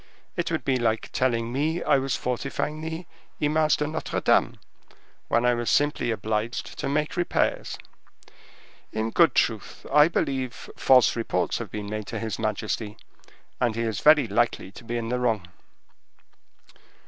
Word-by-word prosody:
It - - -1
would - - -2
be 130 -1 +2
like 115 -2 -1
telling 120 -2 0
me 155 +5 0
I 140 - +4
was 135 -1 -1
fortifying 140 +4 -3
the 160 +2 -5 0.3
Image 155 +1 +2
de 150 - 0
Notre 155 +2 -3
Dame, - - +2 0.7
when 120 - +2
I 125 - +4
was 120 -1 -1
simply 145 -4 +2
obliged 110 +1 -2
to - - -2
make 150 +2 0
repairs. 175 -1 0 1.1
In 110 +1 -2
good 170 +5 +4
truth, 110 -3 0
I 150 +1 +7
believe 135 -7 -2
false 125 -4 +5
reports 90 -6 -1
have 115 -4 -6
been 105 +2 -5
made 105 -1 -4
to - - -4
his 110 -1 -4
majesty, 110 0 -2 0.6
and 120 -3 +1
he 115 - -1
is 110 -4 -2
very 150 -4 +6
likely 110 -3 0
to 100 - -12
be 120 +1 -3
in 115 -1 -3
the 125 +1 0
wrong." 110 -7 0
120 Hz, 160 wpm, -26 LUFS, 110-145 Hz, 1.1 s, I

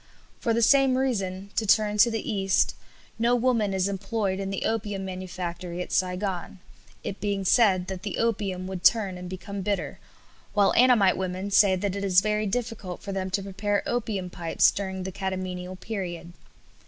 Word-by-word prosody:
For 230 - 0
the 230 +1 +2
same 270 +1 +5
reason 200 -7 -2
to 220 - 0
turn 210 0 +3
to 235 - +7
the 225 -2 -3
East 195 -2 +2 0.5
no 235 +2 +3
woman 235 -4 +1
is 190 0 +1
employed 195 0 -2
in 195 0 -3
the 195 - -3
opium 205 -3 -2
manufactory 180 -1 -5
at 180 - -5
Saigon, 185 0 -1 0.5
it 200 - -5
being 200 -2 -1
said 190 -4 +4
that 185 -1 -6
the 205 0 -4
opium 200 -5 -1
would 185 -1 -6
turn 195 -1 +4
and 180 0 -7
become 190 +2 -6
bitter, 200 +1 -2 0.6
while 200 -1 +4
Annamite 235 -7 +5
women 190 +2 -3
say 200 -1 +5
that 195 +1 -2
it 200 - -3
is 190 -2 +5
very 215 0 0
difficult 220 -4 -4
for 200 - -5
them 190 -1 -2
to 195 +1 -1
prepare 200 +1 -1
opium 215 -7 -2
pipes 170 -2 +2
during 190 -1 -4
the 190 - -4
catamenial 185 -1 -4
period. 175 -5 -5
195 Hz, 175 wpm, -26 LUFS, 185-215 Hz, 0.6 s, to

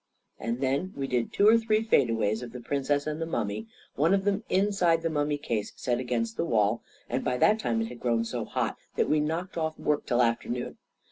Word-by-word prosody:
And 115 +2 -3
then 140 +8 0
we 140 - -2
did 125 -3 -1
two 200 - +4
or 225 +1 +7
three 220 -1 +1
fade 140 - +3
aways 110 -1 0
of 120 -1 -8
the 125 - -6
Princess 140 +3 0
and 155 +1 -3
the 165 - -2
mummy, 110 -6 -2 0.3
one 165 +7 +3
of 195 - 0
them 205 +1 +1
inside 185 -4 +2
the 165 - 0
mummy 145 -1 0
case 115 -7 -3
set 120 -1 -1
against 115 -2 -2
the - - +1
wall; 110 -6 +2 0.3
and - - -2
by 125 - 0
that 215 - +4
time 115 - 0
it - - -3
had 120 -1 -9
grown 115 -2 +1
so - - -3
hot - - -2 0.2
that - - +2
we 155 - +3
knocked 165 +5 -2
off 160 -1 -2
work 150 -1 0
till 125 -1 +3
afternoon. 120 +1 -2
140 Hz, 225 wpm, -28 LUFS, 115-165 Hz, 0.3 s, or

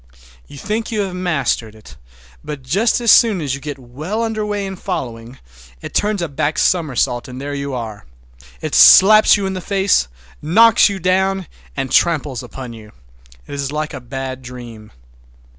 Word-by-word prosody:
You 145 - -12
think 215 +7 -3
you 215 -2 -1
have 190 -2 -4
mastered 140 -11 -2
it, 110 - -15 0.5
but 150 -3 -7
just 200 - +1
as 235 0 +6
you 160 - -2
get 145 -1 -6
well 150 - -5
under 220 -1 -2
way 205 -1 -3
in 190 0 -6
following, 120 - -6 0.4
it - - -9
turns 205 -3 0
a - - -2
back 145 +1 -2
somersault 135 -8 0
and 130 0 -9
there 145 +1 -5
you 140 -1 -4
are. 110 - -7 0.5
It - - -5
slaps 215 +2 +7
you 200 - -3
in 190 - -2
the 185 - -5
face, 195 - +1 0.3
knocks 220 +9 +5
you 200 - -4
down, 190 +1 0 0.3
and 130 - -3
tramples 145 -7 +1
upon 130 -3 -9
you. 110 -2 -13 0.5
It - - -10
is 140 -1 -3
like 155 0 -3
a - - -7
bad 130 +1 -6
dream. 120 -4 -11
150 Hz, 170 wpm, -18 LUFS, 130-195 Hz, 0.5 s, slaps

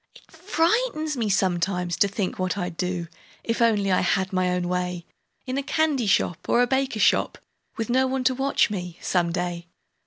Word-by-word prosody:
It - - -19
frightens 330 -1 0
me 230 -4 -1
sometimes, 180 -2 0
to 200 - +4
think 200 -2 -3
what 185 0 -1
I'd 180 -3 -3
do, 180 -1 -3 0.4
If 230 +1 -2
only 210 -4 +3
I 185 - +3
had 190 +1 0
my 185 0 +1
own 180 -1 -1
way 180 -1 -2 0.4
In 260 +1 -2
a - - 0
candy 285 -4 0
shop 175 -3 0
or 245 - +4
a - - +4
baker 265 -1 0
shop, - - +2 0.4
Witn 225 0 -3
no 260 +2 +3
one 260 0 -1
to 255 - +3
watch 270 -3 +1
me, 180 -4 -5
some 175 -2 0
day. 175 -1 -3
195 Hz, 190 wpm, -24 LUFS, 180-260 Hz, 0.4 s, to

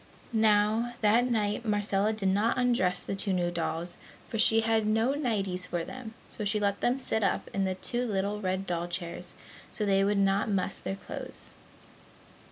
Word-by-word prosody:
Now, 220 +2 +3
that 230 +4 +4
night 215 -1 0
Marcella 205 -1 +1
did 210 -3 0
not 205 +4 +2
undress 235 -8 +2
the - - -4
two 195 0 -1
new 175 -1 0
dolls, 170 0 -3 0.3
for 225 - -4
she 225 +1 +5
had 220 -1 +1
no 225 +5 +2
nighties 200 -10 0
for 175 -1 -2
them, 230 +2 -8 0.2
so 215 - -5
she 210 +1 +1
let 200 -1 0
them 245 +2 +2
sit 220 -4 -1
up 200 - 0
in 195 0 +1
the 190 -1 -1
two 245 +6 -2
little 205 0 -1
red 190 0 -1
doll 175 -1 -2
chairs 175 0 -5 0.4
so 210 - -2
they 195 -1 +3
would 205 +1 +2
not 195 +1 +2
muss 195 -1 0
their 195 - -3
clothes. 195 - -7
205 Hz, 180 wpm, -29 LUFS, 190-225 Hz, 0.4 s, she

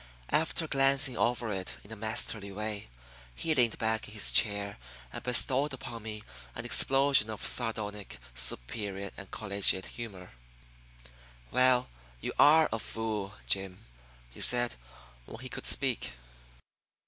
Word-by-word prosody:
After 160 +1 +1
glancing 135 -2 +3
over 120 -2 0
it 95 -1 -4
in 100 - -14
a - - -5
masterly 110 -1 -3
way, 105 - -4 0.5
he 160 - +1
leaned 120 -6 +3
back 110 0 0
in 105 - -10
his 105 - +3
chair 100 - +3 0.3
and - - -5
bestowed 135 +3 +3
upon 120 -3 -6
me 105 0 -6 0.3
an - - -4
explosion 135 -4 +4
of 110 -1 -5
sardonic, 105 - -2 0.2
superior, 95 - -2 0.2
collegiate 100 -3 +2
laughter. 95 -6 -7 1.2
"Well, 125 -1 +4 0.3
you - - -4
are 155 +2 +7
a 115 - -1
fool, 105 -3 -4
Jim," 95 -1 -1 0.5
he - - -9
said, 120 -1 +3 0.5
when - - -9
he 130 - -6
could - - -4
speak. 130 - 0
110 Hz, 130 wpm, -31 LUFS, 100-125 Hz, 1.2 s, are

